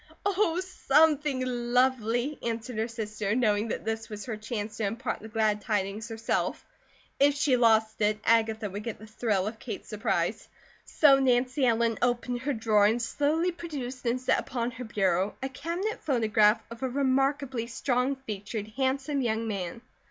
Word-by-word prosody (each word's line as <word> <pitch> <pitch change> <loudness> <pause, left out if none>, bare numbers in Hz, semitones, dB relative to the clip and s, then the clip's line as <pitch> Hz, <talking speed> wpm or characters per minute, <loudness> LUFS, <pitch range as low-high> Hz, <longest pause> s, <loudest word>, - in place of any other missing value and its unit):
"Oh, 380 -4 +2
something 300 -5 +2
lovely!" 245 +1 +1
answered 230 0 -3
her 220 - 0
sister, 215 -2 -3
knowing 215 -3 +2
that - - -4
this 225 0 -3
was 210 -1 -7
her 235 -4 -3
chance 215 -1 -5
to 225 - -2
impart 225 +5 -2
the 220 - -9
glad 215 -1 +1
tidings 210 +1 -2
herself; 225 0 -2 0.5
if 285 0 +5
she 290 -2 +3
lost 220 -2 +3
it, 210 0 +2
Agatha 220 -1 +2
would 205 +2 -5
get 230 -1 -5
the 215 - -12
thrill 215 -3 -1
of 220 +1 -5
Kate's 220 -5 -7
surprise. 205 -3 -1 0.4
So 275 -3 +5
Nancy 255 +1 +2
Ellen 230 -1 +2
opened 245 0 0
her 285 +2 -1
drawer 220 -3 +3
and 225 +3 +1
slowly 300 +8 0
produced 280 -7 -6
and 240 +2 +1
set 255 - +2
upon 240 -1 -3
her 245 +1 -7
bureau 195 -2 0
a 265 - -1
cabinet 340 +10 -3
photograph 220 -5 +3
of 230 - -9
a 260 - -1
remarkably 270 -2 0
strong 250 +2 0
featured, 215 -4 -6
handsome 270 +4 -1
young 225 -2 -1
man. 195 0 -4
235 Hz, 165 wpm, -28 LUFS, 215-265 Hz, 0.5 s, if